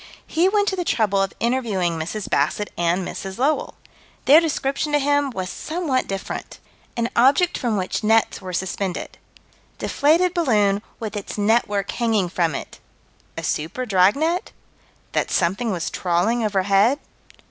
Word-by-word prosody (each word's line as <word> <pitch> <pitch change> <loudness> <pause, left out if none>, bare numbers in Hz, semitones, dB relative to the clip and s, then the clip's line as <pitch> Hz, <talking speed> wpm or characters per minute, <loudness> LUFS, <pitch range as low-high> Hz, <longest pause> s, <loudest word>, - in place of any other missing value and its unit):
He 340 +4 +2
went 410 0 +2
to 380 - -2
the 360 - -2
trouble 205 - +1
of 195 - 0
interviewing 225 -8 0
Mrs. 175 +6 -4
Bassett 155 +9 0
and 175 +2 0
Mrs. 190 -1 -6
Lowell. 280 +5 0 0.5
Their 300 +4 +8
description 295 -2 -1
to - - +5
him 285 0 +1
was 190 -7 -4
somewhat 305 - -2
different: 195 -1 -5 0.4
An 235 0 +1
object 280 +9 +4
from 230 -4 -1
which 185 +3 -2
nets 220 0 +2
were 185 -1 -6
suspended 185 +1 -3 0.6
Deflated 335 +5 +2
balloon, 210 - +2 0.2
with 220 -2 -5
its 205 0 -5
network 205 -2 +1
hanging 220 -6 0
from 170 -4 0
it - - -7 0.6
A - - -4
super 165 +12 -2
dragnet? 250 - +2 0.6
That - - 0
something 195 +7 0
was 175 -4 -3
trawling 185 +7 0
overhead? 200 +4 +3
215 Hz, 145 wpm, -22 LUFS, 190-275 Hz, 0.6 s, Their